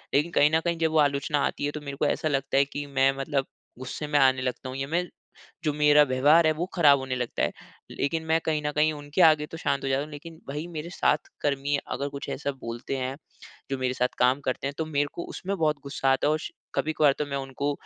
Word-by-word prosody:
लेकिन 155 Hz, +4 st, +2 dB
कहीं 150 Hz, 0 st, +4 dB
न -, -, +4 dB
कहीं 170 Hz, -1 st, 0 dB
जब 160 Hz, -1 st, +2 dB
वो 160 Hz, -, +1 dB
आलोचना 145 Hz, 0 st, +2 dB
आती 145 Hz, -, -2 dB
है 145 Hz, -, -1 dB
तो 150 Hz, -, -6 dB
मेरे 140 Hz, -1 st, -7 dB
को -, -, +1 dB
ऐसा 155 Hz, -, 0 dB
लगता 135 Hz, -1 st, 0 dB
है 140 Hz, -, +5 dB
कि 145 Hz, +1 st, -6 dB
मैं 135 Hz, -1 st, +3 dB
मतलब 135 Hz, -1 st, -1 dB, 0.3 s
गुस्से 135 Hz, +4 st, -5 dB
में 145 Hz, -1 st, +2 dB
आने 130 Hz, -1 st, +4 dB
लगता 130 Hz, 0 st, -3 dB
हूँ 130 Hz, -, -6 dB
या 135 Hz, 0 st, -3 dB
मैं 170 Hz, +3 st, 0 dB, 0.6 s
जो 150 Hz, -, +2 dB
मेरा 150 Hz, 0 st, +6 dB
व्यवहार 145 Hz, +5 st, +4 dB
है 155 Hz, -, +4 dB
वो 170 Hz, +3 st, -2 dB
खराब 145 Hz, -5 st, +6 dB
होने 130 Hz, -1 st, -3 dB
लगता 125 Hz, -1 st, -2 dB
है। -, -, +1 dB, 0.4 s
लेकिन 160 Hz, +3 st, -1 dB
मैं 160 Hz, +1 st, +2 dB
कहीं 155 Hz, -1 st, +1 dB
न 150 Hz, -, +1 dB
कहीं 155 Hz, +1 st, +3 dB
उनके 145 Hz, +4 st, -1 dB
आगे 155 Hz, -2 st, +5 dB
तो 165 Hz, -, -9 dB
शांत 140 Hz, -3 st, -1 dB
हो -, -, 0 dB
जाता 135 Hz, +1 st, +1 dB
हूँ 150 Hz, -, -8 dB
लेकिन 160 Hz, +2 st, -10 dB
वहीं 150 Hz, +4 st, -4 dB
मेरे 160 Hz, +2 st, -5 dB
साथ 150 Hz, -3 st, +1 dB
कर्मी 140 Hz, 0 st, 0 dB, 0.2 s
अगर 140 Hz, +2 st, -2 dB
कुछ 140 Hz, 0 st, -7 dB
ऐसा 140 Hz, +1 st, -2 dB
बोलते 120 Hz, +3 st, -4 dB
हैं 130 Hz, +1 st, -3 dB, 0.5 s
जो 135 Hz, -, -1 dB
मेरे 130 Hz, 0 st, -1 dB
साथ 125 Hz, 0 st, +1 dB
काम 130 Hz, +3 st, +3 dB
करते 130 Hz, 0 st, -2 dB
हैं 140 Hz, -, -6 dB
तो 160 Hz, -, -1 dB
मेरे 145 Hz, -2 st, 0 dB
को 170 Hz, -, -5 dB
उसमें 195 Hz, +2 st, -3 dB
बहुत 155 Hz, -3 st, +1 dB
गुस्सा 135 Hz, -1 st, 0 dB
आता 135 Hz, -, +1 dB
है। 150 Hz, -, +3 dB
और 155 Hz, -, +1 dB
श -, -, -6 dB, 0.2 s
कभी-कभार 155 Hz, -2 st, +3 dB
तो 150 Hz, -, 0 dB
मैं 140 Hz, -1 st, -3 dB
उनको 135 Hz, +1 st, -2 dB
145 Hz, 255 wpm, -26 LUFS, 135-155 Hz, 0.6 s, मेरा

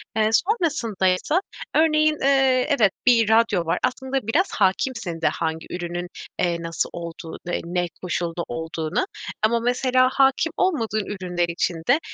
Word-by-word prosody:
Eee, 215 Hz, -1 st, +3 dB
sonrasındaysa, 295 Hz, -, +1 dB, 0.3 s
örneğin, 310 Hz, -1 st, +3 dB
eee, 270 Hz, -2 st, +3 dB
evet, 230 Hz, -10 st, +4 dB
bir 230 Hz, -4 st, +5 dB
radyo 220 Hz, -6 st, +3 dB
var. 165 Hz, +2 st, 0 dB
Aslında 260 Hz, -1 st, -1 dB
biraz 345 Hz, +12 st, +1 dB
hâkimsin 190 Hz, -3 st, 0 dB
de -, -, +3 dB
hangi 160 Hz, 0 st, -2 dB
ürünün, 175 Hz, 0 st, -4 dB, 0.3 s
eee, 175 Hz, -1 st, +1 dB
nasıl 165 Hz, 0 st, -2 dB
olduğu, 170 Hz, -1 st, -7 dB
eee, 175 Hz, -, -1 dB
ne 175 Hz, +1 st, -1 dB, 0.2 s
koşulda 170 Hz, -1 st, -2 dB
olduğuna. 160 Hz, -, -2 dB, 0.4 s
Ama 235 Hz, +2 st, +3 dB
mesela 255 Hz, +2 st, +2 dB
hâkim 270 Hz, +4 st, +3 dB
olmadığın 225 Hz, -, 0 dB
ürünler 180 Hz, -3 st, -2 dB
için 170 Hz, +1 st, -1 dB
de, 275 Hz, +5 st, +5 dB
220 Hz, 140 wpm, -23 LUFS, 175-265 Hz, 0.4 s, bir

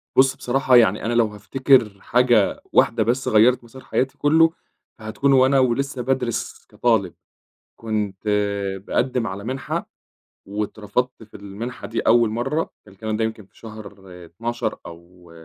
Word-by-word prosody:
بُصّ، 130 Hz, 0 st, +4 dB
بصراحة 130 Hz, 0 st, +1 dB
يعني 110 Hz, -3 st, +4 dB
أنا 120 Hz, -, 0 dB
لو 115 Hz, -2 st, +3 dB
هافتكر 105 Hz, +1 st, +1 dB
حاجة 120 Hz, -4 st, +2 dB
واحدة -, -, +3 dB
بس 125 Hz, +3 st, -1 dB
غيّرِت 120 Hz, +3 st, +4 dB
مسار 130 Hz, +3 st, -14 dB
حياتي 135 Hz, +1 st, -2 dB
كلّه، 160 Hz, +2 st, +4 dB, 0.5 s
فهتكُون 110 Hz, +6 st, 0 dB
وأنا 135 Hz, +1 st, +4 dB
ولسه 130 Hz, +1 st, 0 dB
بادرِس 125 Hz, -2 st, -2 dB
كطالب، 110 Hz, -7 st, +1 dB, 0.6 s
كنت 105 Hz, -2 st, -4 dB, 0.6 s
باقدّم 125 Hz, -2 st, 0 dB
على 100 Hz, +1 st, -6 dB
مِنحة 130 Hz, +2 st, -4 dB, 0.6 s
واترفضت 105 Hz, +4 st, -3 dB
في 110 Hz, -, -13 dB
المنحة 100 Hz, +5 st, -7 dB
دي 115 Hz, -, -3 dB
أول 120 Hz, -1 st, +4 dB
مرّة، 135 Hz, +8 st, -2 dB, 0.2 s
الكلام 105 Hz, +2 st, -5 dB
ده 115 Hz, -, 0 dB
يمكن 110 Hz, -2 st, -4 dB
في -, -, -30 dB
شهر 110 Hz, -2 st, -10 dB, 0.3 s
12 115 Hz, +6 st, -4 dB
أو، 85 Hz, +1 st, -14 dB
115 Hz, 135 wpm, -22 LUFS, 105-130 Hz, 0.6 s, بُصّ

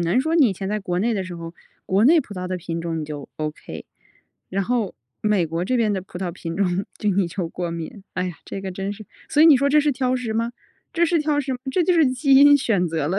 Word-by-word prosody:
能 175 Hz, +9 st, +2 dB
说 320 Hz, +4 st, -1 dB
你 275 Hz, -8 st, +6 dB
以 -, -, -1 dB
前 190 Hz, +1 st, -5 dB
在 210 Hz, +1 st, -1 dB
国 180 Hz, -2 st, -2 dB
内 230 Hz, +3 st, +1 dB
的 195 Hz, -3 st, -2 dB
时 180 Hz, -1 st, -7 dB
候， 165 Hz, 0 st, -8 dB, 0.3 s
国 195 Hz, +4 st, +3 dB
内 320 Hz, +4 st, +6 dB
葡 210 Hz, -6 st, -10 dB
萄 180 Hz, 0 st, -4 dB
的 185 Hz, -, -2 dB
品 165 Hz, -1 st, -5 dB
种 165 Hz, -1 st, -3 dB
你 155 Hz, -, -4 dB
就 145 Hz, -2 st, -7 dB
OK， 155 Hz, -1 st, -6 dB, 0.7 s
然 195 Hz, +1 st, 0 dB
后 230 Hz, -3 st, -1 dB, 0.3 s
美 210 Hz, -5 st, +2 dB
国 165 Hz, +2 st, -2 dB
这 255 Hz, +7 st, 0 dB
边 220 Hz, -3 st, +2 dB
的 190 Hz, -, -1 dB
葡 180 Hz, -1 st, -10 dB
萄 185 Hz, -2 st, -2 dB
品 165 Hz, -1 st, -6 dB
种 190 Hz, -1 st, 0 dB
就 210 Hz, -, +1 dB
你 190 Hz, -1 st, +1 dB
就 170 Hz, 0 st, -3 dB
过 175 Hz, -1 st, -4 dB
敏。 170 Hz, +4 st, -7 dB
哎 185 Hz, 0 st, -1 dB
呀， 175 Hz, -4 st, -6 dB
这 195 Hz, -, -6 dB
个 190 Hz, -1 st, -5 dB
真 195 Hz, +2 st, -4 dB
是， 215 Hz, +1 st, -10 dB, 0.2 s
所 300 Hz, -, +4 dB
以 -, -, +8 dB
你 295 Hz, -4 st, +8 dB
说 280 Hz, +2 st, +2 dB
这 300 Hz, +1 st, +5 dB
是 295 Hz, 0 st, +2 dB
挑 255 Hz, -1 st, 0 dB
食 235 Hz, -3 st, -3 dB
吗？ 230 Hz, +1 st, -1 dB, 0.4 s
这 340 Hz, 0 st, +2 dB
是 335 Hz, 0 st, +2 dB
挑 300 Hz, -1 st, +1 dB
食 265 Hz, -2 st, -3 dB
这 355 Hz, -, +2 dB
就 360 Hz, -, +3 dB
是 320 Hz, -4 st, +5 dB
基 270 Hz, +2 st, +2 dB
因 285 Hz, +1 st, +8 dB
选 200 Hz, -9 st, +1 dB
择 155 Hz, -2 st, -1 dB
了。 190 Hz, +3 st, 0 dB
200 Hz, 295 characters per minute, -22 LUFS, 175-255 Hz, 0.7 s, 以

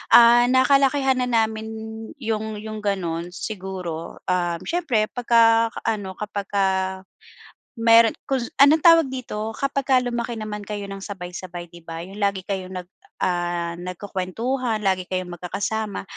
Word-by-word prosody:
ah, 240 Hz, +1 st, +8 dB
nakalakihan 270 Hz, 0 st, +4 dB
na 250 Hz, -, 0 dB
namin 220 Hz, -2 st, +1 dB, 0.5 s
'yong 220 Hz, -3 st, -3 dB
'yong 215 Hz, 0 st, -6 dB
gano'n 175 Hz, -5 st, -2 dB
siguro, 185 Hz, -4 st, -6 dB
uhm, 175 Hz, -2 st, 0 dB
siyempre 305 Hz, -11 st, +1 dB
pagka 230 Hz, -1 st, +4 dB
ka -, -, -5 dB
ano, 200 Hz, -3 st, -2 dB
kapagka 200 Hz, -1 st, -1 dB, 1.1 s
meron 230 Hz, 0 st, +6 dB, 0.2 s
kung 265 Hz, -2 st, 0 dB, 0.2 s
anong 295 Hz, +3 st, +6 dB
tawag 330 Hz, -2 st, +7 dB
dito? 225 Hz, -4 st, -5 dB
Kapag 275 Hz, +1 st, -1 dB
ka 265 Hz, -, +3 dB
lumaki 240 Hz, -1 st, -2 dB
naman 210 Hz, -2 st, -6 dB
kayo 205 Hz, -2 st, -5 dB
ng 195 Hz, -, -6 dB
sabay-sabay, 180 Hz, -3 st, -7 dB
'di 170 Hz, -1 st, -15 dB
ba, 165 Hz, 0 st, -6 dB
'yong 190 Hz, +4 st, -10 dB
lagi 200 Hz, -2 st, 0 dB
kayong 190 Hz, -1 st, -4 dB
nag, 175 Hz, -, -27 dB, 0.3 s
ah, 175 Hz, -1 st, -1 dB
nagkukuwentuhan, 205 Hz, +6 st, -3 dB
lagi 190 Hz, -2 st, +1 dB
kayong 185 Hz, -1 st, -3 dB
magkakasama, 205 Hz, +4 st, -3 dB
210 Hz, 135 wpm, -23 LUFS, 185-235 Hz, 1.1 s, ah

